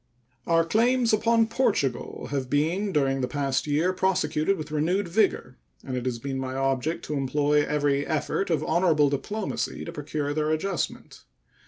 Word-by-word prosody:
Our 165 -1 +3
claims 235 +5 +2
upon 230 +1 +3
Portugal 205 - -1
have 135 -3 -2
been 170 +8 0
during 135 -4 +1
the 125 - 0
past 135 +1 -1
year 155 +6 +1
prosecuted 185 -1 +1
with 155 -1 -7
renewed 175 +6 0
vigor, 170 - 0 0.2
and 130 - -4
it 125 0 -3
has 125 -2 -1
been 135 +2 -4
my 130 0 -4
object 135 +3 -1
to 150 - -4
employ 145 +2 +2
every 145 -2 +1
effort 160 +5 -1
of 155 -3 +1
honorable 160 -4 +3
diplomacy 205 +9 -3
to 170 - -6
procure 150 -2 -3
their 155 0 0
adjustment. 155 +1 -3
150 Hz, 160 wpm, -26 LUFS, 140-185 Hz, 0.2 s, Our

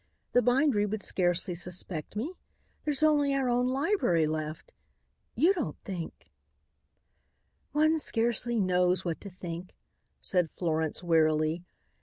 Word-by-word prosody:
The 245 - +4
bindery 245 -3 +3
would 210 0 -3
scarcely 180 0 0
suspect 175 -1 -4
me. 260 - -3 0.5
There's 295 0 0
only 290 -2 +4
our 270 -2 +1
own 245 +1 +2
library 260 - +2
left. 155 0 -4 0.6
You 330 - +4
don't 335 -7 -3
think 180 -4 -7 0.7
" - - -46
"One 310 +2 +3
scarcely 235 -2 0
knows 180 -1 +2
what 170 -2 -3
to 200 - -7
think," 180 -1 -7 0.4
said 180 -3 +2
Florence 160 -1 -1
wearily. 160 0 +2
190 Hz, 125 wpm, -29 LUFS, 170-260 Hz, 0.7 s, The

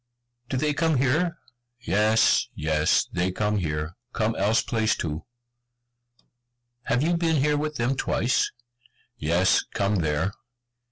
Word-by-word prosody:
"Do 130 - -1
they 150 +2 +1
come 160 -1 +1
here?" 155 +7 +1 0.4
"Yes, 110 0 +3
yes, 75 0 +2
they 90 +1 0
come 105 +2 -1
here, 80 -2 -3 0.2
come 110 0 0
else 110 +3 +2
place 110 -2 0
too." 80 -1 -4 1.6
"Have 125 +4 +1
you 170 +2 +2
been 165 -1 +1
here 150 +1 +2
with 150 +1 -2
them 125 +2 0
twice?" 125 -1 0 0.7
"Yes, 85 +4 +2
come 100 +1 +1
there." 80 +2 0
110 Hz, 125 wpm, -25 LUFS, 90-145 Hz, 1.6 s, Yes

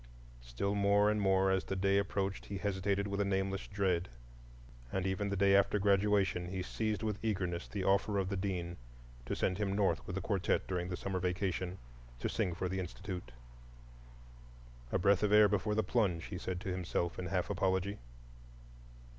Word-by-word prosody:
Still, - - -2
more 100 +1 +4
and 105 0 0
more 95 -1 +3
as 95 0 +1
the 95 - -3
day 100 +1 +3
approached 100 -1 -2
he 100 - -4
hesitated 100 0 0
with 100 0 -1
a - - +3
nameless 95 0 -1
dread; 95 -4 0 0.8
and 95 0 -1
even 95 +2 -1
the 100 - -1
day 100 0 +4
after 100 +1 +4
graduation 100 -2 +2
he 95 0 -3
seized 110 +2 -2
with 105 -2 -1
eagerness 95 -5 -1
the 100 -3 -4
offer 100 +2 +2
of 95 -2 0
the 100 - -1
Dean 90 -3 -3 0.5
to - - -1
send 90 +2 0
him 100 -2 0
North 100 -1 +1
with 90 - -4
the - - -1
quartette 95 -1 0
during 90 -1 -2
the 90 - -3
summer 95 -1 -2
vacation, 90 0 -1 0.4
to - - -2
sing 90 -3 -1
for 90 - -2
the 95 +1 -2
Institute. 90 -5 -6 1.6
A - - +2
breath 100 +1 +3
of 105 -1 +2
air 105 0 +8
before 105 +1 0
the 110 - +2
plunge, 95 -9 +1
he 90 -3 -6
said 95 -2 -3
to 95 - -4
himself 90 -1 -2
in 90 - -3
half 90 -1 -1
apology. 95 +2 0
95 Hz, 185 wpm, -34 LUFS, 90-100 Hz, 1.6 s, air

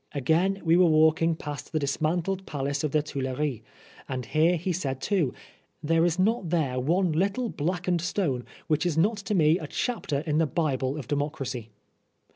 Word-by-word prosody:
Again, 170 +8 +1
we 165 +1 +4
were 180 -1 +6
walking 160 +1 +4
past 145 -4 -7
the - - +2
dis 140 -1 -2
mantled 180 +4 -1
palace 140 0 -2
of 155 - +1
the 150 0 +2
Tuileries, 135 -3 -3 0.5
and 130 -2 -3
here 160 +8 +3
he 180 +3 -2
said 135 -7 -3
too, 175 -6 +1 0.3
" - - -41
There 165 +2 +3
is 175 0 +1
not 195 -1 +1
there 145 -7 0
one 170 +7 +1
little 200 +9 0
blackened 175 +1 -1
stone 165 -8 -1 0.2
which 155 0 +1
is 175 -3 0
not 205 +7 +3
to 205 0 -2
me 160 0 +4
a - - -6
chapter 215 - -2
in 155 -1 0
the 165 - +3
Bible 135 -2 -1
of 135 -6 -6
Democracy.' 140 -5 -3
160 Hz, 185 wpm, -27 LUFS, 140-180 Hz, 0.5 s, were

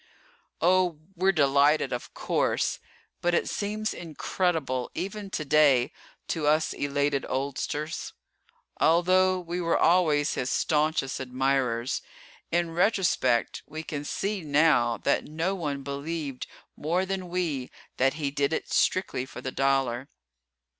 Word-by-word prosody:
Oh, 180 -1 +3 0.2
we're 190 +2 +3
delighted 145 -3 +3
of 120 - -6
course, - - 0 0.4
but 175 0 +2
it - - +1
seems 215 +1 -2
incredible 160 -5 -2
even 195 +3 -4
today 150 -8 +3 0.4
to 155 -3 -1
us 155 +1 +2
elated 140 0 0
oldsters. 140 +4 -3 0.7
Although 185 +3 +4
we 175 0 -4
were 170 -1 +2
always 155 -4 +3
his 125 - -2
staunchest 150 -3 +1
admirers, 130 -2 0 0.5
in 170 0 0
retrospect 170 - +1
we 155 +1 -6
can 145 -2 -5
see 200 +6 -2
now 145 -6 +3
that 140 - 0
no 165 +5 -2
one 145 -7 -3
believed 140 -1 -4 0.3
more 175 +5 0
than 190 -1 -4
we 165 -8 -2 0.3
that 135 +1 +2
he 145 -3 -2
did 140 +1 0
it - - -3
strictly 130 -8 +1
for - - -9
the 130 - -4
dollar. 135 -2 0
155 Hz, 125 wpm, -27 LUFS, 135-175 Hz, 0.7 s, Although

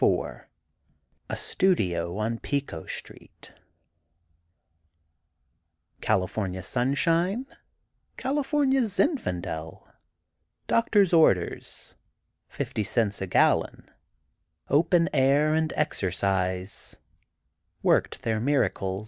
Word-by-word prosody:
IV - - 0 0.8
A - - -2
STUDIO 90 - 0
ON 115 +2 -2
PICO 140 - -3
STREET - - -9 2.5
California 95 0 -1
sunshine, 165 - +1 0.7
California 270 0 +1
Zinfandel—doctor's 200 - -2
orders, 125 - +1 0.5
fifty 110 - -3
cents 105 -2 0
a 95 - -2
gallon—open 165 - 0
air 140 +3 +3
and 160 0 +1
exercise—worked 95 - -2
their 110 -1 0
miracle. 110 -7 0
130 Hz, 65 wpm, -26 LUFS, -, 2.5 s, air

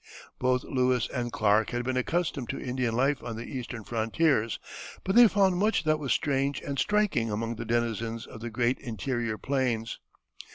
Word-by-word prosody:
Both 125 0 +2
Lewis 125 -2 +1
and 120 -2 -2
Clark 105 0 +2
had 120 0 -2
been 130 +1 -1
accustomed 140 -1 -1
to 135 - -3
Indian 125 -3 -1
life 135 +3 +2
on 115 -2 -5
the 115 - -5
Eastern 125 -4 -6
frontiers, 115 +2 +1 0.5
but 190 - -1
they 240 0 +9
found 190 -3 +3
much 210 +1 +2
that 155 -1 +2
was 140 -3 -2
strange 140 -1 +1
and 140 -1 -4
striking 210 - +1
among 115 +2 -2
the 115 - -5
denizens 115 -1 -1
of 110 - -11
the 120 - -4
great 120 +3 0
interior 115 0 -3
plains. 125 -5 -1
125 Hz, 175 wpm, -28 LUFS, 115-140 Hz, 0.5 s, they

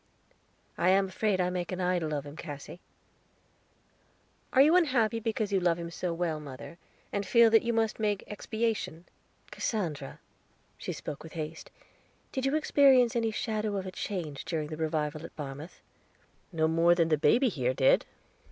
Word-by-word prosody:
"I 175 - +3
am 195 0 +3
afraid 200 0 0
I 180 0 +1
make 180 0 -3
an 185 - -4
idol 180 -3 0
of 145 0 -4
him, 145 +1 -9
Cassy." 150 +1 -8 1.7
"Are 265 - +6
you 310 +4 +5
unhappy 245 -10 +3
because 220 -2 -2
you 195 - +3
love 175 -2 +2
him 170 -1 -6
so 175 0 -3
well, 165 -2 -2
mother, 150 +4 -10 0.3
and 200 - 0
feel 235 +2 +5
that 225 - +6
you 235 - -1
must 225 -1 0
make 210 -2 0
expiation?" 215 -5 -3 0.5
"Cassandra," 160 - -3 0.6
she - - -4
spoke 145 - -6
with 160 - -11
haste, 155 0 -6 0.6
"did 265 -1 -1
you 275 - +1
experience 270 -6 +4
any 230 -1 +1
shadow 215 -1 -2
of 190 - -4
a 185 - -5
change 170 -8 -4
during 155 -3 -3
the 155 - -5
revival 155 -1 -2
at - - -10
Barmouth?" 145 +3 -8 0.7
"No 160 -2 +1
more 165 +2 +4
than 165 -2 +2
the 155 - +4
baby 240 - +4
here 130 - -1
did." 135 -1 +3
180 Hz, 170 wpm, -29 LUFS, 160-220 Hz, 1.7 s, Are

